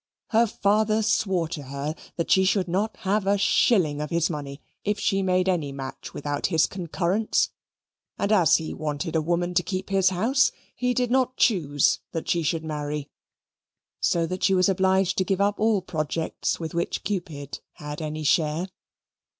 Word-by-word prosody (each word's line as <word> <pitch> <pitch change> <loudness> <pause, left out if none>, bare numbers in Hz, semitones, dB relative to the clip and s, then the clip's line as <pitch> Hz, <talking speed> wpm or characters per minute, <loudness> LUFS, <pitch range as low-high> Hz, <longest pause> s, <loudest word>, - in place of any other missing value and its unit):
Her 230 +1 +4
father 215 +1 +1
swore 190 -5 +1
to 160 - -5
her 140 +2 -4 0.2
that 170 - -2
she 190 - +5
should 190 -1 +2
not 200 +6 -1
have 200 0 0
a 200 +1 +3
shilling 180 -7 +3
of 150 - -4
his 170 0 +1
money 140 -2 -6 0.2
if 210 0 0
she 195 0 +1
made 185 -1 +1
any 165 -7 0
match 135 -1 -7
without 145 0 -2
his 160 -3 +3
concurrence; 185 +3 0 0.7
and 200 - -1
as 180 -8 +5
he 160 - -2
wanted 155 +2 -3
a 160 - +3
woman 175 +2 -1
to 180 - +3
keep 185 +1 -4
his 190 -1 +4
house, 230 +9 +2 0.2
he 250 0 -1
did 250 -1 0
not 255 0 +1
choose 145 - +2
that 165 - -4
she 170 - +1
should 160 +1 -1
marry, 150 -1 -4 0.9
so 170 -1 +2
that 185 +3 -4
she 195 - +4
was 185 0 +4
obliged 190 -1 +2
to - - +3
give 190 +1 -1
up 205 +1 +1
all 215 -3 +2
projects 160 -1 -2
with 160 -2 -5
which 170 0 -2
Cupid 170 -8 -4
had 150 +1 -7
any 155 0 -4
share. 155 +4 +1
180 Hz, 175 wpm, -25 LUFS, 155-200 Hz, 0.9 s, she